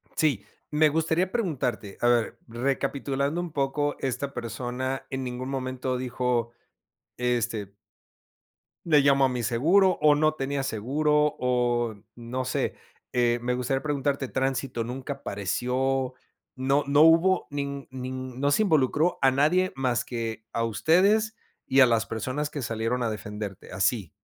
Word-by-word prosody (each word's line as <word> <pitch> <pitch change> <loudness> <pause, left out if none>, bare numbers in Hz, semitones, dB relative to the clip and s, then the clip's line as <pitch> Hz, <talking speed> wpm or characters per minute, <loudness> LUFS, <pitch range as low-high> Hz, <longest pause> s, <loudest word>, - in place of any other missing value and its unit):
Sí, 140 -10 +1 0.3
me 155 +1 +4
gustaría 160 +4 0
preguntarte, 135 - -2
a 120 - +3
ver, 120 -2 +2
recapitulando 140 +5 -1
un 175 -2 -5
poco, 145 0 0
esta 135 +2 -3
persona 125 +3 -4
en 135 0 -3
ningún 125 +1 -5
momento 130 -1 -2
dijo: 125 -2 -1 0.7
"Este 115 -5 -1 1.1
¿le 155 -4 +5
llamo 140 -1 +4
a - - +2
mi 125 -1 -3
seguro?" 170 - +3
O 150 -1 +6
¿no 155 +1 +3
tenía 140 -1 -2
seguro?, 150 +6 +1
o 120 -2 +1 0.2
no 120 +2 -4
sé. 130 - -1 0.4
Eh, 120 -1 +2
me 125 +1 0
gustaría 125 +2 -1
preguntarte, 140 -2 -1
¿tránsito 130 -2 -1
nunca 130 +4 -5
apareció? 130 +4 -1 0.4
No 135 +3 +1
no 145 +1 +4
hubo 165 +4 +5
nin 140 -1 -4
nin 130 0 -6
no 140 +1 +2
se 215 - +3
involucró 155 -1 +2
a 135 -1 +5
nadie 160 +8 +2
más 125 -3 0
que 115 -2 -4
a 115 - 0
ustedes 195 - +3 0.3
y 135 - +3
a - - +9
las 115 -2 +2
personas 130 +6 -3
que 145 - -5
salieron 115 +2 -1
a 115 - 0
defenderte, 105 -2 -7
así. 100 -2 0
130 Hz, 145 wpm, -26 LUFS, 120-145 Hz, 1.1 s, a